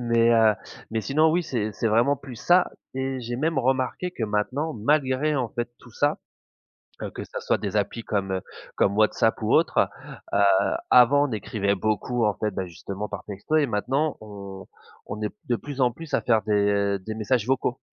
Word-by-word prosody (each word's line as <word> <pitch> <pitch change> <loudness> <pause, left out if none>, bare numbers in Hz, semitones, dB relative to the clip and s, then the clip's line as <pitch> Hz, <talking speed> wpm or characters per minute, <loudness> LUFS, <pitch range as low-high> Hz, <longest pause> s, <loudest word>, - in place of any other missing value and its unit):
Mais 115 -1 +3
heu, 110 -2 +5 0.4
mais 110 0 -1
sinon 155 +5 +3
oui 175 +2 +2
c'est 110 -7 -2
c'est 110 +3 -1
vraiment 115 +6 +3
plus 130 -3 -10
ça 175 +7 +3 0.2
et 130 0 -2
j'ai 120 0 -4
même 155 +2 0
remarqué 130 +7 0
que 120 - -6
maintenant 125 +9 -1
malgré 140 +4 +1
en 125 -4 0
fait 120 0 -3
tout 125 - -16
ça- 145 +4 +1 0.8
heu - - -4
que - - -6
ça - - -7
soit - - +1
des 100 0 -3
applis 105 +3 -1
comme 100 -2 -1
heu, 95 - -1 0.4
comme 100 0 +2
WhatsApp 110 0 +2
ou - - +1
autre- - - +3 0.6
heu, - - +3 0.5
avant 140 +4 +6
on - - -7
écrivait 100 -1 -1
beaucoup 110 +4 0
en 105 - +1
fait- 110 - -1
bah 95 0 -3
justement 100 +4 -6
par 100 -2 -6
texto- 105 +9 -4
et 150 - +4
maintenant 135 +7 0
on 100 -3 -9 0.4
on 105 +1 -6
est 105 - -2
de 120 - +1
plus 140 0 -7
en 125 -2 +3
plus 165 +4 -8
à - - +3
faire 110 -3 +3
des 100 -1 +1
des 110 +4 -6
messages 110 +1 0
vocaux. 130 -1 0
115 Hz, 195 wpm, -25 LUFS, 105-135 Hz, 0.8 s, avant